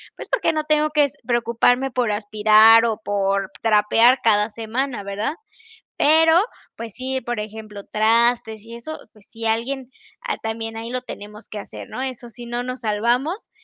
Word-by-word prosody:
Pues - - -10
porque 420 -9 +1
no 310 - -1
tengo 305 0 +2
que 300 -1 +4
s 285 +1 -8
preocuparme 240 +2 +2
por 245 -3 0
aspirar 215 +2 +5
o 225 -2 0
por 195 -2 -1
trapear 225 +3 +4
cada 210 -1 +3
semana 230 +1 -3
¿verdad? 200 +7 -2 0.6
Pero, 320 +2 +5 0.4
pues 225 -2 -7
sí, 260 +1 -3
por 240 -1 -4
ejemplo, 215 -1 -8
trastes 225 0 +1
y 230 +1 -10
eso, 310 +7 -7 0.2
pues 210 -2 -21
si 230 -1 -8
alguien 250 +4 -2 0.3
ha 465 -3 -3
también 225 0 -5
ahí 230 +1 -6
lo 255 0 -2
tenemos 210 -3 -10
que 210 - -6
hacer - - -10
¿no? - - -5
Eso 255 -2 -5
sí, 240 +1 -10
no 240 +1 -3
nos 255 +1 -5
salvamos. 240 - -1
230 Hz, 170 wpm, -21 LUFS, 215-255 Hz, 0.6 s, aspirar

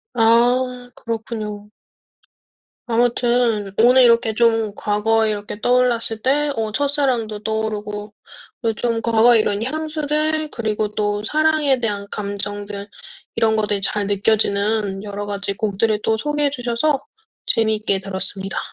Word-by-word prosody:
아 245 +2 +2
그렇군요. 215 -2 -5 1.2
아무튼 235 -3 +1
오늘 250 +3 +6
이렇게 235 -2 +4
좀 225 -2 +2
과거에 220 +2 +1
이렇게 205 0 -5
떠올랐을 240 -3 +2
때 290 +3 +1
어 220 -1 -2
첫사랑도 255 -7 0
떠오르고 210 -1 -3 0.5
또 225 -1 +1
좀 230 0 -1
과거에 230 +1 +4
이런 205 0 -1
향수들 310 +2 -1
그리고 215 -2 -2
또 205 0 -1
사랑에 305 -2 +2
대한 205 -3 -2
감정들 205 0 -4 0.5
이런 220 -1 +2
것들이 210 -2 0
잘 200 +1 0
느껴지는 205 0 +1
여러 205 0 -5
가지 200 -1 -2
곡들을 210 +1 0
또 220 - +1
소개해 295 +1 0
주셔서 265 +2 0 0.5
재미있게 215 -3 +1
들었습니다. 195 0 -3
220 Hz, 285 characters per minute, -20 LUFS, 205-245 Hz, 1.2 s, 오늘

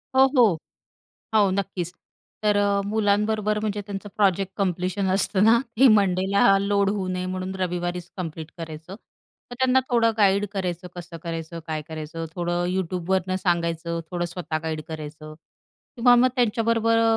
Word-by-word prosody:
हो, 265 - +7
हो. 210 -9 +5 0.8
हो, 205 -3 +5
नक्कीच. 185 -2 -2 0.5
तर 210 -1 +3
अ, 200 0 +2
मुलांबरोबर 210 0 +1
म्हणजे 210 -1 -2
त्यांचं 200 0 -6
प्रोजेक्ट 195 -2 +2
कंप्लीशन 190 0 -1
असतं 195 0 +2
ना, 225 +2 +6 0.2
ते 270 - +8
मंडेला 195 0 +3
लोड 200 0 +1
होऊ 200 -2 -2
नये 185 0 -2
म्हणून 185 +1 -4
रविवारीच 175 -1 -2
कंप्लीट 165 -3 -6
करायचं. 160 +2 -8 0.6
मग 245 - -6
त्यांना 260 0 +4
थोडं 230 -1 +3
गाईड 200 0 +3
करायचं, 180 -3 -3
कसं 175 -1 -8
करायचं, 165 0 -5
काय 155 -1 -3
करायचं, 160 +1 -6
थोडं 175 0 -1
YouTubeवरनं 185 0 -1
सांगायचं, 170 -1 -1
थोडं 175 -1 -2
स्वतः 170 -2 -4
गाईड 160 -1 -3
करायचं 155 -1 -8 0.6
किंवा 245 +1 +6
मग 250 +1 +5
त्यांच्याबरोबर 230 -1 +2
अ, 225 0 +3
190 Hz, 145 wpm, -24 LUFS, 175-205 Hz, 0.8 s, ते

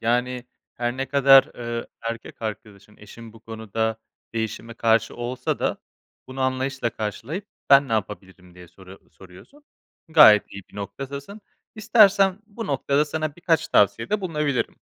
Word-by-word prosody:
Yani, 125 +2 -1 0.3
her 120 +1 -3
ne 135 +1 -3
kadar, 135 -1 +6
ııı, 120 -1 -5
erkek 115 0 -7
arkadaşın, 105 -1 -8
eşin 110 +2 -13
bu 115 - -16
konuda 110 0 -3 0.4
değişime 115 +1 -4
karşı 115 -1 +1
olsa 120 +1 -3
da - - -1 0.5
bunu 130 +1 -8
anlayışla 130 -1 -1
karşılayıp, 135 - -5 0.2
"Ben 140 0 +7
ne 115 - -4
yapabilirim?" 95 -3 -5
diye 90 -1 -14
soru 95 0 -16
soruyorsun. 95 - -17 0.4
Gayet 150 -10 +7
iyi 100 - -8
bir - - -16
noktadasın. 140 - -7 0.3
İstersen 200 -3 +4
bu 225 +1 -7
noktada 140 +1 +1
sana 155 0 -4
birkaç 165 -2 0
tavsiyede 115 - +2
bulunabilirim. 150 -7 -2
120 Hz, 135 wpm, -23 LUFS, 110-145 Hz, 0.5 s, Ben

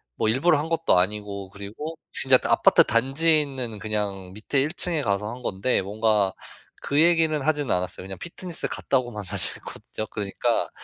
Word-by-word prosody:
뭐 - - 0
일부러 150 +7 +3
한 155 +2 -3
것도 165 - +2
아니고 100 0 -2
그리고 105 +12 -7 0.2
진짜 130 -1 +5
그 - - -4
아파트 - - +6
단지에 140 +7 +3
있는 130 -7 -5
그냥 100 -3 -3
밑에 110 +7 0
1 150 - 0
층에 170 -4 0
가서 105 -2 -1
한 125 +2 -8
건데 100 +5 0
뭔가 105 -1 +1 0.5
그 140 +1 0
얘기는 165 -2 +3
하진 145 -3 0
않았어요. 90 0 -2
왜냐면 95 -1 -8
피트니스 175 - -4
갔다고만 120 -6 -1
사실 90 - +1
했거든요. 110 - -7
그러니까 100 -2 -1
115 Hz, 375 characters per minute, -25 LUFS, 100-150 Hz, 0.5 s, 아파트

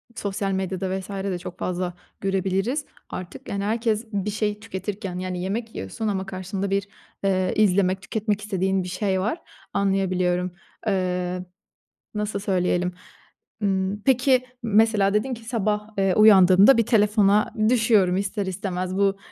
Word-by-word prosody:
sosyal 200 -2 -2
medyada 190 0 -2
vs.de 190 -1 -4
çok 180 0 -9
fazla 180 0 -2 0.3
görebiliriz 195 - 0 0.2
artık, 180 -1 -8
yani, 200 0 -2
herkes 220 +1 0
bir 200 0 -1
şey 210 0 -1
tüketirken. 195 -3 -5
Yani, 185 -1 -3
yemek 220 +4 -3
yiyorsun 95 - -4
ama 195 -2 -1
karşında 190 +1 -4
bir, 200 0 0 0.4
eee, 185 -2 +1
izlemek, 190 -2 +3
tüketmek 210 +1 -2
istediğin 190 -2 0
bir 180 - -6
şey 190 +1 0
var. 220 - -2 0.3
Anlayabiliyorum. 185 -2 +1 0.4
Eee, 180 -2 -1 0.7
nasıl 210 -1 -2
söyleyelim? 180 -2 0 0.7
Imm, 195 0 0
peki 255 0 +3 0.2
mesela 215 -2 +3
dedin 215 +5 0
ki: 230 -1 -9
"Sabah, 210 -2 -1
eee, 195 -1 +2
uyandığımda 200 +2 +7
bir 230 - +3
telefona 210 -2 +3 0.2
düşüyorum 220 -6 +3
ister 200 +1 -2
istemez." 185 -1 -3
Bu, 195 0 +2
195 Hz, 135 wpm, -24 LUFS, 185-210 Hz, 0.7 s, uyandığımda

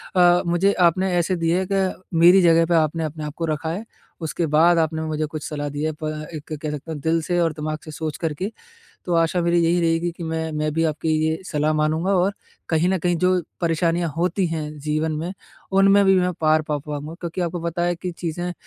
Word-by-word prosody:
अ, 175 -1 +5
मुझे 175 +4 +2
आपने 180 +2 +2
ऐसे 180 +2 +1
दी 165 -1 -1
है, 185 +3 +1
कि 190 -1 -1 0.2
मेरी 180 +3 +7
जगह 165 -1 +5
पे 170 +1 +1
आपने 160 0 +1
अपने 155 0 -5
आप 150 -1 -5
को 165 - -1
रखा 155 +1 -2
है, 195 +7 -4 0.4
उसके 165 +1 -2
बाद 160 +3 +4
आपने 160 -1 0
मुझे 155 -1 -2
कुछ 150 0 -6
सलाह 145 -1 -3
दी 145 +1 -4
है, 155 - 0
प 155 0 -8
अ, 155 0 -4
एक 155 +1 -7
कह 155 -1 -3
सकते 150 +2 -6
हैं, 150 - -5
दिल 165 +2 +1
से 175 +2 -1
और 165 -2 +1
दिमाग 155 0 -4
से 155 - -8
सोच 155 -1 -4
कर 160 -3 -2
के। 190 +8 -4 0.5
तो, 175 - -1
आशा 165 +2 +2
मेरी 170 0 +2
यही 175 +1 +2
रहेगी 165 +1 +1
कि 170 - -8
मैं 160 0 -2
मैं 155 0 -1
भी 165 +1 +1
आपकी 155 +1 -1 0.2
ये 160 0 -1
सलाह 155 -2 0
मानूँगा 155 +5 +1
और 185 +3 +2 0.4
कहीं 165 +2 +2
न 190 0 +1
कहीं 175 +1 0
जो 180 +1 +2 0.2
परेशानियाँ 170 0 +1
होती 180 +2 +1
हैं, 155 -2 -4
जीवन 155 +2 -1
में, 165 +5 -3 0.4
उनमें 195 +1 +5
भी 195 - +5
मैं 180 0 0
पार 155 0 +3
पा 150 0 -2
पाऊँगा। 150 +2 -6
क्योंकि 170 +1 -4
आपको 175 0 -2
पता 170 +1 -2
है 175 0 +1
कि 180 +1 -4
चीज़ें 175 +1 -3
165 Hz, 235 wpm, -22 LUFS, 155-175 Hz, 0.5 s, मेरी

